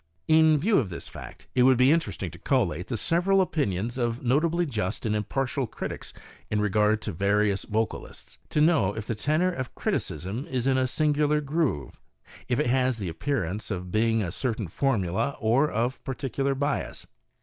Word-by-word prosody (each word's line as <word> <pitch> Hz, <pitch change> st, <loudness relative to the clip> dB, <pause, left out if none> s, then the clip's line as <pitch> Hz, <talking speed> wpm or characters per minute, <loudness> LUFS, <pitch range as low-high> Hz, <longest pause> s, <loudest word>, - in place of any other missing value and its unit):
In 160 Hz, -1 st, +5 dB
view 200 Hz, +8 st, +3 dB
of 110 Hz, -9 st, -2 dB
this 85 Hz, -, -7 dB
fact, -, -, -10 dB
it 125 Hz, -, +3 dB
would 130 Hz, 0 st, +6 dB
be 130 Hz, +3 st, +5 dB
interesting 165 Hz, +1 st, -1 dB
to -, -, -12 dB
collate 90 Hz, -, 0 dB
the 120 Hz, -, -2 dB
several 175 Hz, -, +2 dB
opinions 120 Hz, -, -1 dB
of 120 Hz, 0 st, -1 dB
notably 160 Hz, +7 st, +2 dB
just 110 Hz, -, -3 dB
and 105 Hz, -1 st, +1 dB
impartial 135 Hz, +5 st, -1 dB
critics -, -, -6 dB, 0.4 s
in 105 Hz, -, 0 dB
regard 105 Hz, +1 st, +2 dB
to 105 Hz, -, -3 dB
various 100 Hz, +2 st, +1 dB
vocalists, 110 Hz, +1 st, -4 dB
to 150 Hz, -, +1 dB
know 150 Hz, -, +3 dB
if 110 Hz, -1 st, -5 dB
the 115 Hz, -, -2 dB
tenor 155 Hz, -, +1 dB
of 130 Hz, -7 st, -5 dB
criticism 95 Hz, -, -3 dB
is 130 Hz, -2 st, -1 dB
in 135 Hz, -1 st, +3 dB
a 130 Hz, -, +2 dB
singular 150 Hz, +1 st, +2 dB
groove; 145 Hz, -, -2 dB, 0.5 s
if 120 Hz, -, 0 dB
it -, -, +2 dB
has 130 Hz, 0 st, +2 dB
the 100 Hz, -5 st, -4 dB
appearance 100 Hz, -, -2 dB
of 90 Hz, -3 st, -4 dB
being 115 Hz, +1 st, +2 dB
of 90 Hz, -, -3 dB
a -, -, -6 dB
certain 115 Hz, -2 st, -2 dB
formula 110 Hz, -, 0 dB
or 125 Hz, +7 st, +3 dB
of 120 Hz, +4 st, -2 dB
particular 135 Hz, +1 st, -2 dB
bias. 140 Hz, +1 st, -2 dB
125 Hz, 180 wpm, -26 LUFS, 105-145 Hz, 0.5 s, would